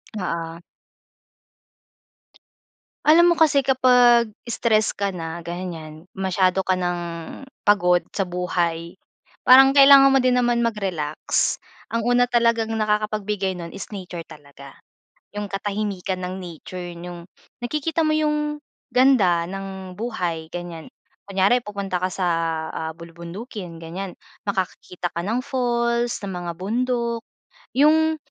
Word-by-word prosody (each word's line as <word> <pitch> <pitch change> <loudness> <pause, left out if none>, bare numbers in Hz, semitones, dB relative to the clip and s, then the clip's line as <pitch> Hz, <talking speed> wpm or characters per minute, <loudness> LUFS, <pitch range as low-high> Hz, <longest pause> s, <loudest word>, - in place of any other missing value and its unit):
Oo. 170 -4 -4 2.5
Alam 340 +3 +6
mo - - -6
kasi 290 -3 +4
kapag 245 -4 +4 0.2
stress 220 -2 +2
ka 200 -1 -2
na 165 -1 -5
ganyan, 170 -2 -7
masyado 190 0 +1
ka 185 - +2
ng 175 -1 -1 0.6
pagod 180 -4 +4
sa 195 - -2
buhay. 175 -1 -2 0.5
Parang 265 +1 +9
kailangan 275 -1 +8
mo 270 - +5
din 255 -1 +3
naman 240 -1 +2
mag-relax. 185 -9 -1 0.4
Ang 230 - +1
una 245 +1 +3
talagang 230 -2 +2
nakakapag-bigay 210 -2 -1
nun 170 -1 -7
is 195 - -7
nature 180 -4 -7
talaga, 140 -3 -14 0.6
yung 205 0 -4
katahimikan 195 -2 -3
ng 180 0 -4
nature, 180 +1 -8 0.2
yung 175 0 -8 0.4
nakikita 305 +5 -1
mo 310 - +2
yung 300 -1 0 0.3
ganda 230 -10 +4
ng 190 -1 -7
buhay, 175 -8 -3
ganyan. 175 -2 -7 0.3
Kunyari 200 +5 +2
pupunta 195 -3 -4
ka 185 - 0
sa, 180 -1 -1 0.5
ah, 160 0 -3
bulubundukin, 170 +3 -9
ganyan, 180 +4 -6 0.3
makakakita 185 -2 -3
ka 170 - -3
ng 220 +6 -1
falls, 240 -2 0
ng 200 -2 -6
mga 175 -1 -4
bundok. 235 +3 -1 0.5
Yung 315 +3 +4
195 Hz, 120 wpm, -23 LUFS, 175-240 Hz, 2.5 s, Parang